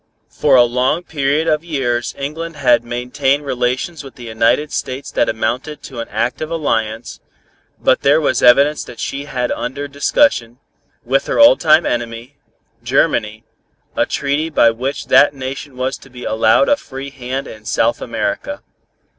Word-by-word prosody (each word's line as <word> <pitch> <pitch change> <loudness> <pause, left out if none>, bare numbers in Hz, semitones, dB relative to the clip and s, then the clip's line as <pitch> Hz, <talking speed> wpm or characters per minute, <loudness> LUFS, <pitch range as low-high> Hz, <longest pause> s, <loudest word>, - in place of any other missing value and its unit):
For - - +3
a 125 - +7
long 125 +7 0
period 150 -1 -1
of 155 +1 +1
years 130 -7 -2
England 160 +4 -5
had 125 -5 +3
maintained 135 +4 -1
relations 130 +5 -2
with 135 - -12
the 125 - -11
United 115 +6 +1
States 130 +2 -4
that - - +1
amounted 130 +7 -3
to 130 -4 -8
an 115 - -4
active 120 +8 -2
alliance, 115 -9 -2 0.6
but - - +2
there 145 +3 +4
was 150 - 0
evidence 140 +5 +5
that 120 - -12
she 140 +1 -4
had 125 -4 -2
under 145 +1 -4
discussion, 140 - +1 0.5
with 135 +3 +1
her - - -1
old 285 0 +7
time 160 0 +4
enemy, 120 +3 -4 0.4
Germany, 110 +1 0 0.5
a - - +1
treaty 145 +3 -1
by 115 -7 +4
which 130 +5 -4
that 145 - +5
nation 135 +1 -7
was 130 +1 -2
to 135 - -16
be 125 -1 -11
allowed 110 +9 +3
a 290 - +3
free 135 - -8
hand 130 +1 -5
in 110 -1 -11
South 115 +1 0
America. 290 - -3
135 Hz, 160 wpm, -17 LUFS, 120-145 Hz, 0.6 s, a